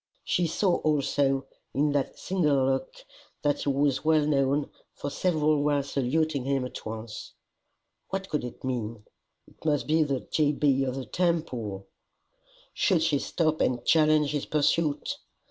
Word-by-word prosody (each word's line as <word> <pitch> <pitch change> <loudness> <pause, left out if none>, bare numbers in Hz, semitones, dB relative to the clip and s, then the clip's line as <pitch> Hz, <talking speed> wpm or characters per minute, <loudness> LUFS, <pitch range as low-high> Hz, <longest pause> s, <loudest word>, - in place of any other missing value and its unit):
She 175 - +1
saw 175 +2 +1
also, 140 -2 +1 0.3
in 145 +1 +2
that 140 -2 -1
single 150 -8 +1
look, 135 0 0 0.5
that 145 -1 +1
he - - -1
was 140 -1 +1
well 155 -1 +3
known, 140 -1 +1 0.2
for 145 - -5
several 155 -4 +1
were 145 -1 +2
saluting 140 +1 0
him 135 -1 0
at 125 - -7
once. 110 0 -7 0.8
What 195 0 -3
could 150 - -2
it 125 - -8
mean? 115 -4 -3 0.4
It - - -21
must 150 -3 +1
be 160 +1 +3
the 140 -4 0
G. 150 -1 +1
B. 140 -2 +2
of 130 -1 -2
the 135 -1 -4
Temple! 130 - -1 0.9
Should 175 -6 +2
she 155 -3 +2
stop 155 0 0
and 120 -1 0
challenge 155 -2 +4
his 145 -2 -2
pursuit? 150 0 +1
145 Hz, 150 wpm, -27 LUFS, 135-155 Hz, 0.9 s, challenge